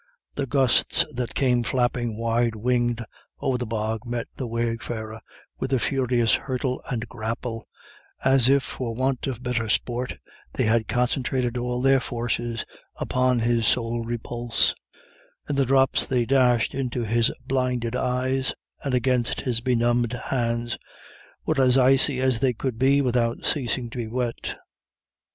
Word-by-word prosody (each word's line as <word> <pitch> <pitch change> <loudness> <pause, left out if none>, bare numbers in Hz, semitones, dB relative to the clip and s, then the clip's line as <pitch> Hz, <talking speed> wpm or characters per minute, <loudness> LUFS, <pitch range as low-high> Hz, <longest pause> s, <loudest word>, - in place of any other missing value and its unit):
The 140 -1 -3
gusts 130 0 +3
that 120 -2 -4
came 125 -3 +2
flapping 120 -2 0
wide 115 0 +1
winged 120 0 0 0.3
over 125 -2 0
the 125 - -3
bog 110 0 -2
met 120 -1 -3
the 130 - -4
wayfarer 115 -1 -3 0.4
with 135 - -3
a - - +4
furious 125 -3 +1
hurtle 130 -1 -1
and 120 -2 -3
grapple, 115 0 -5 0.6
as 130 -2 +5
if 140 0 +4
for 120 -4 -4
want 130 +1 -1
of 125 -2 -4
better 120 -3 -1
sport 120 +2 -1 0.4
they - - 0
had 110 0 +2
concentrated 125 0 0
all 125 0 -2
their 135 0 +5
forces 120 -1 -3 0.3
upon 130 -1 +1
his 115 -1 +2
sole 115 +1 +1
repulse; 120 0 0 0.7
and 145 - -1
the 135 -1 +3
drops 135 +1 +3
they 125 -2 +1
dashed 125 -2 +3
into 125 -2 -2
his 115 +1 +2
blinded 125 -3 -1
eyes 130 +1 0 0.3
and 135 -3 0
against 125 -1 +1
his 120 -3 -1
benumbed 120 -1 +1
hands 120 -1 -2 0.7
were 155 -3 +2
as 130 0 +5
icy 135 +1 +4
as 130 -3 +2
they 130 0 +2
could 120 -1 -4
be 140 +2 +4
without 120 -2 0
ceasing 125 -3 0
to 125 - -6
be 115 - -3
wet. 120 +1 -3
125 Hz, 145 wpm, -25 LUFS, 115-130 Hz, 0.7 s, as